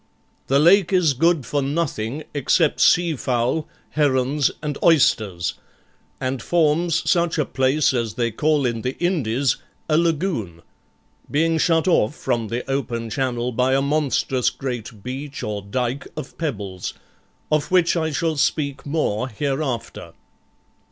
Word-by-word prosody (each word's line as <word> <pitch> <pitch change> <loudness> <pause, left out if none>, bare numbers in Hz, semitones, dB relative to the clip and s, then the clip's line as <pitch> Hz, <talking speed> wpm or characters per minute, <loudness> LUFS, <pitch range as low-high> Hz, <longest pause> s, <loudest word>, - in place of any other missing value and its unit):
The 135 - +3
lake 175 +5 +5
is 180 -6 +3
good 165 +1 +2
for 145 +4 -1
nothing 140 -2 -2
except 145 +3 +2
sea 170 -2 +4
fowl, 125 +4 -1 0.2
herons, 140 -1 +2
and 150 -1 -2
oysters, 110 - +3 0.7
and 130 -1 -2
forms 165 +2 +1
such 170 -1 +2
a 150 - +1
place 135 +3 +2
as 115 -4 -2
they 120 -1 0
call 150 +4 +1
in 115 -2 -1
the 130 +2 -3
Indies 140 -8 0 0.3
a 155 0 +3
lagoon; 155 - -1 0.7
being 160 +2 +1
shut 165 +1 +2
off 150 -7 +2
from 115 -2 -1
the 120 +3 -4
open 120 -4 -2
Channel 125 0 -1
by 125 +3 +2
a 135 - +2
monstrous 140 -3 +1
great 120 -5 -6
beach 135 +3 -6
or 105 -1 -3
dike 125 +6 -3
of 130 - -7
pebbles, 100 - -4 0.6
of 150 -1 +1
which 180 -2 +3
I 160 -2 0
shall 160 +1 -1
speak 140 -1 -1
more 130 -6 0
hereafter. 130 -1 -3
140 Hz, 140 wpm, -22 LUFS, 120-155 Hz, 0.7 s, lake